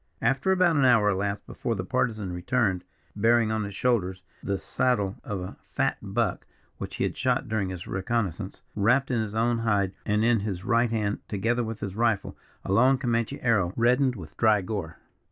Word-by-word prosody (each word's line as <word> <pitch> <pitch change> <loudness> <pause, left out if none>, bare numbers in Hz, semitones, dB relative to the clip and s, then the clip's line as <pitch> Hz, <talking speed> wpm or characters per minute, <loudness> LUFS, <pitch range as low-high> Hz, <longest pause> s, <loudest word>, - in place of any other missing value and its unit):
About 175 +4 +2
an 140 - +3
hour 115 -5 +5
elapsed 100 +1 -1
before 115 - -3
the 95 - -3
Partisan 110 -4 -1
returned, 95 +1 0 0.3
bearing 115 +1 +3
on 110 -1 0
his 100 -1 -7
shoulders 95 -7 0 0.2
the 100 -1 -1
saddle 105 -4 0
of 100 -3 -4
a 90 - -7
fat - - 0
buck, - - -2 0.3
which - - -6
he - - -1
had - - -1
shot - - 0
during 105 -4 -1
his 90 -2 -6
reconnaissance, 95 -1 -3
wrapped 125 +7 +2
in 120 - +1
his 110 -1 -4
own 115 +1 +1
hide, 100 -4 +1
and 105 +1 +1
in 115 -1 +4
his 100 -2 -4
right 115 0 +3
hand, 105 -2 -1
together 115 +4 0
with 115 -1 -5
his 100 -2 -4
rifle, 115 -3 0 0.3
a - - -3
long 130 +6 +5
Comanche 115 -3 -1
arrow 100 -7 +2
reddened 125 +2 +3
with 80 -6 -10
dry 110 -2 +4
gore. 90 -4 -5
110 Hz, 185 wpm, -27 LUFS, 100-120 Hz, 0.3 s, hour